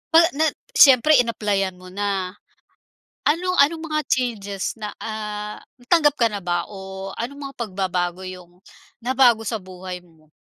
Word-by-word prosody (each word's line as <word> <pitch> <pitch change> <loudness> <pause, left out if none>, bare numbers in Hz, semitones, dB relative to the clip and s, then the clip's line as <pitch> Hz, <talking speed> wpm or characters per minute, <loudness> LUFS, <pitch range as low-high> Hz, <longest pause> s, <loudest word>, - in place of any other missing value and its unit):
pag 335 - +9
nag 315 +2 +1 0.2
siyempre 280 +2 +7
in-applyan 205 -5 0
mo 185 - -12
na. 195 -2 -2 0.9
Ano, 360 +4 +1
anong 315 +3 +4
mga 305 0 0
changes 205 -6 -1
na, 210 -1 -5
ah, 210 -1 -5 0.2
natanggap 295 +3 +4
ka 230 - +5
na 205 -3 -6
ba? 175 -1 -1
O 190 -1 -7
anong 280 +5 -5
mga - - -44
pagbabago 185 -5 -2
yung 180 -1 -10 0.4
nabago 240 -3 +3
sa 225 - -1
buhay 185 -2 -8
mo? 160 -3 -24
210 Hz, 145 wpm, -22 LUFS, 185-250 Hz, 0.9 s, pag